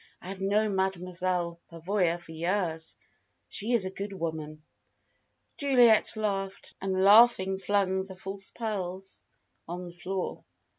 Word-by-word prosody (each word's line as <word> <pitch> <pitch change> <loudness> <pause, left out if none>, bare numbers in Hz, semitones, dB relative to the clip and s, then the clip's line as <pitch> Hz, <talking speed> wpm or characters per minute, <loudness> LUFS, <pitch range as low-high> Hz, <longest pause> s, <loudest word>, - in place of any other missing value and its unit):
"I 180 - -9
have 195 0 -6
known 205 +1 +1
Mademoiselle 180 -2 -1
Pavoya 175 +1 0
for 175 - -13
years. 165 -1 -2 0.5
She 215 +4 +1
is 225 -5 +4
a 185 - -3
good 200 +1 -6
woman." 155 -4 -5 0.9
Juliet 245 -7 +4
laughed, 195 -2 -2
and 190 0 0
laughing 200 -2 +6
flung 190 -1 +1
the 190 -1 -10
false 195 +1 -3
pearls 195 -4 -5 0.5
on 175 +2 -5
the 175 - -10
floor. 185 +1 -4
190 Hz, 130 wpm, -29 LUFS, 175-200 Hz, 0.9 s, laughing